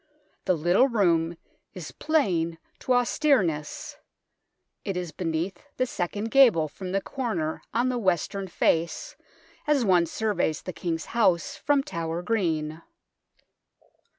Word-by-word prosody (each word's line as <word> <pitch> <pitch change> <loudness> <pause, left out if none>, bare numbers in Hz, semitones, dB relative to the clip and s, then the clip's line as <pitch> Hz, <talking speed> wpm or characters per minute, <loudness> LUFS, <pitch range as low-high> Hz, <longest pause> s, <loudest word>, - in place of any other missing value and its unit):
The 185 - +3
little 175 - +3
room 170 -8 +2 0.4
is 175 -5 -7
plain 180 - 0 0.2
to 255 - 0
austereness. 240 - +1 0.9
It 195 -4 -3
is 175 -3 -4
beneath 175 +2 -3
the 255 - +2
second 210 0 -3
gable 235 - +6
from 180 +4 -7
the 195 +1 +1
corner 190 - -3
on 240 +3 +1
the 250 -1 -1
western 190 0 0
face 165 -2 0 0.5
as 285 -5 +3
one 180 -3 +4
surveys 185 -5 -1
the 185 - -5
King's 165 -2 -3
House 185 -8 +2
from 285 -1 +1
Tower 170 - -4
Green. 160 -7 -1
185 Hz, 125 wpm, -26 LUFS, 165-235 Hz, 0.9 s, gable